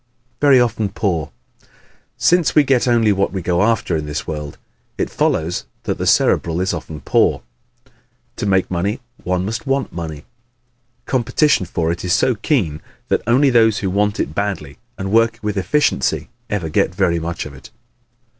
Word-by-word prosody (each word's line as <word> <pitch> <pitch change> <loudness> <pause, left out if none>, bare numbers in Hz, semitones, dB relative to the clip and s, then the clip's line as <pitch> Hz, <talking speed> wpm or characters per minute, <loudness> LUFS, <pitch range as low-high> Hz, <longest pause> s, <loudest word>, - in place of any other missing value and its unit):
Very 140 -3 +6
Often 110 -4 0
Poor 85 -8 -1 0.4
¶ - - -28 0.5
Since 175 -2 +3
we 150 - +7
get 130 -2 +2
only 115 -3 +3
what 100 0 +1
we 95 -2 -4
go 90 +1 +1
after 105 -5 +1
in 75 -1 -3
this 75 0 -4
world, 75 -2 -6 0.4
it - - -2
follows 85 +3 0 0.2
that - - -3
the - - -1
Cerebral 85 0 +2
is 95 0 0
often 80 -2 -6
poor. - - +2 0.9
To 105 - -2
make 95 -2 +1
money 100 +7 -1 0.2
one 90 0 -1
must 115 +6 -4
want 135 0 -1
money. 80 -3 -6 0.8
Competition 130 - +1
for 85 -1 -1
it 85 - -4
is 90 -1 +1
so 125 - +3
keen 100 - -1 0.3
that - - +2
only 130 +3 +4
those 110 -3 +4
who 95 -2 -2
want 105 +2 0
it - - -2
badly 95 -9 -3 0.2
and 95 0 -4
work 115 +1 +3
with 105 -1 -2
efficiency 100 - 0 0.2
ever 100 -6 -2
get 80 +3 0
very 90 -3 +1
much 85 +1 -4
of 75 - -9
it. 70 0 -13
95 Hz, 175 wpm, -19 LUFS, 85-115 Hz, 0.9 s, we